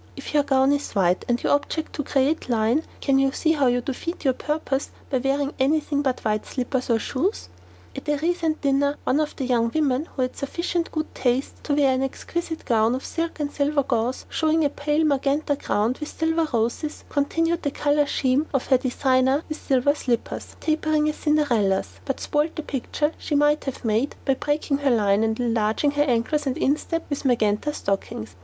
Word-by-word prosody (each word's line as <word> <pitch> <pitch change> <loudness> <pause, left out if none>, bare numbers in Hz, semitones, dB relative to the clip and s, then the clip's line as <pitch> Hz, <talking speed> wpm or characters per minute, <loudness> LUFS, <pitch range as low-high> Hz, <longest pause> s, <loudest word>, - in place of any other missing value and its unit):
If - - -8
your 295 - +5
gown 270 -1 +3
is 285 0 -1
white 185 -3 +2
and 240 0 +1
your - - +3
object 310 +2 -1
to 290 - -3
create 275 +2 0
line, 230 +5 +2 0.2
can 270 -1 +3
you 270 0 +3
see 320 +3 +1
how 290 -4 +2
you 245 0 +2
defeat 290 +7 -5
your 265 - +4
purpose 295 -1 -2 0.2
by 260 - +2
wearing 275 +2 0
anything 290 +1 +1
but 265 -3 -1
white 215 -1 +1
slippers 255 0 -2
or 230 - +4
shoes? 295 - -2 0.5
At - - -6
a 295 - +2
recent 325 0 0
dinner 280 +1 +2
one 275 - +2
of 305 -1 -1
the 270 - -3
young 235 -2 +2
women 290 -2 +1
who 260 - -2
had 255 - -3
sufficient 340 +4 -2
good 310 0 -3
taste 255 +1 -1
to 290 - +1
wear 275 -2 +4
an 260 - 0
exquisite 320 +4 -4
gown 230 0 +3
of 260 - -6
silk 330 -1 -3
and 290 -1 -2
silver 285 0 +1
gauze, 245 0 -1
showing 315 0 +1
a 285 - +1
pale 295 +2 0
magenta 285 +1 +1
ground 230 -1 -1
with 300 - -5
silver 325 0 0
roses, 240 +6 -1
continued 330 +4 0
the 285 - 0
colour 290 +1 +1
scheme 275 +3 +1
of 265 - +1
her 260 - +4
designer 260 +2 +2
with 310 - -5
silver 270 +1 +2
slippers, 245 -5 -3
tapering 310 -1 +1
as 305 - -3
Cinderella's, 240 -11 +1
but 270 - -2
spoiled 300 +2 0
the 315 - -4
picture 295 +3 -1
she 300 - -2
might 295 +1 +3
have 270 -3 -5
made 225 +6 +1
by 270 - +3
breaking 290 +1 -1
her 285 -1 +1
line 210 -3 +3
and 220 +1 0
enlarging 230 +3 +1
her 290 0 0
ankles 275 +3 0
and 260 - -1
instep 310 +4 0
with 285 - -3
magenta 235 +1 +1
stockings. 195 - -3
280 Hz, 195 wpm, -24 LUFS, 250-300 Hz, 0.5 s, your